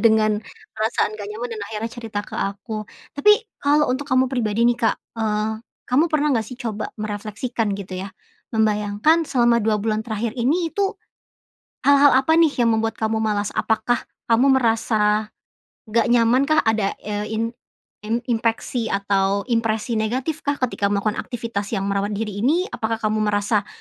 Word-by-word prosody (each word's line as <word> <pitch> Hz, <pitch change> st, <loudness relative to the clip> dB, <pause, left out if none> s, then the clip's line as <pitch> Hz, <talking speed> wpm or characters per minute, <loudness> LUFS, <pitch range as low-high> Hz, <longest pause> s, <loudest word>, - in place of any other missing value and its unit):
dengan 220 Hz, -1 st, +5 dB, 0.5 s
perasaan 215 Hz, -1 st, 0 dB
nggak 205 Hz, -1 st, -6 dB
nyaman 240 Hz, +3 st, -5 dB
dan -, -, -6 dB
akhirnya 225 Hz, +1 st, -4 dB
cerita 220 Hz, -3 st, -4 dB
ke -, -, -9 dB
aku, 215 Hz, +2 st, -3 dB, 0.3 s
tapi 420 Hz, +9 st, +5 dB, 0.3 s
kalau 295 Hz, 0 st, +3 dB
untuk 260 Hz, +3 st, -1 dB
kamu 255 Hz, -1 st, +3 dB
pribadi 230 Hz, -4 st, -1 dB
nih, 240 Hz, -, +2 dB
Kak, 230 Hz, -, +2 dB, 0.2 s
eee, 215 Hz, -1 st, 0 dB, 0.4 s
kamu 265 Hz, +6 st, +4 dB
pernah 300 Hz, 0 st, +2 dB
nggak 220 Hz, -, 0 dB
sih 250 Hz, -, -9 dB
coba 220 Hz, -3 st, -4 dB
merefleksikan, 215 Hz, +2 st, -3 dB
gitu 195 Hz, -1 st, -6 dB
ya? 195 Hz, -, -9 dB, 0.4 s
Membayangkan 215 Hz, +9 st, +2 dB
selama 240 Hz, -4 st, +3 dB
2 215 Hz, -2 st, +1 dB
bulan 220 Hz, 0 st, -1 dB
terakhir 225 Hz, +2 st, -3 dB
ini 320 Hz, +8 st, +1 dB
itu, 400 Hz, +3 st, 0 dB, 0.9 s
hal-hal 285 Hz, 0 st, +6 dB
apa 270 Hz, +5 st, +4 dB
nih 325 Hz, -3 st, +5 dB
yang 235 Hz, -, +4 dB
membuat 225 Hz, 0 st, 0 dB
kamu 220 Hz, 0 st, +1 dB
malas? 210 Hz, -2 st, 0 dB
Apakah 225 Hz, +2 st, 0 dB, 0.2 s
kamu 230 Hz, +4 st, +4 dB, 0.2 s
merasa 215 Hz, -2 st, +1 dB, 0.6 s
nggak 225 Hz, 0 st, +2 dB
nyamankah 255 Hz, +6 st, +4 dB
ada, 215 Hz, -3 st, +1 dB
eee, 210 Hz, 0 st, -3 dB
in 220 Hz, +1 st, 0 dB, 0.6 s
in 230 Hz, +2 st, -1 dB
inpeksi 230 Hz, +1 st, 0 dB
atau 200 Hz, 0 st, +1 dB
impresi 225 Hz, 0 st, 0 dB
negatifkah 265 Hz, +6 st, -1 dB
ketika 220 Hz, -5 st, 0 dB
melakukan 205 Hz, +2 st, 0 dB
aktivitas 230 Hz, -4 st, -4 dB
yang 195 Hz, -, -1 dB
merawat 200 Hz, +1 st, -1 dB
diri 210 Hz, -1 st, -4 dB
ini? 300 Hz, -, +2 dB
Apakah 220 Hz, 0 st, -2 dB
kamu 215 Hz, 0 st, +1 dB
merasa 205 Hz, 0 st, +1 dB
225 Hz, 155 wpm, -22 LUFS, 210-245 Hz, 0.9 s, hal-hal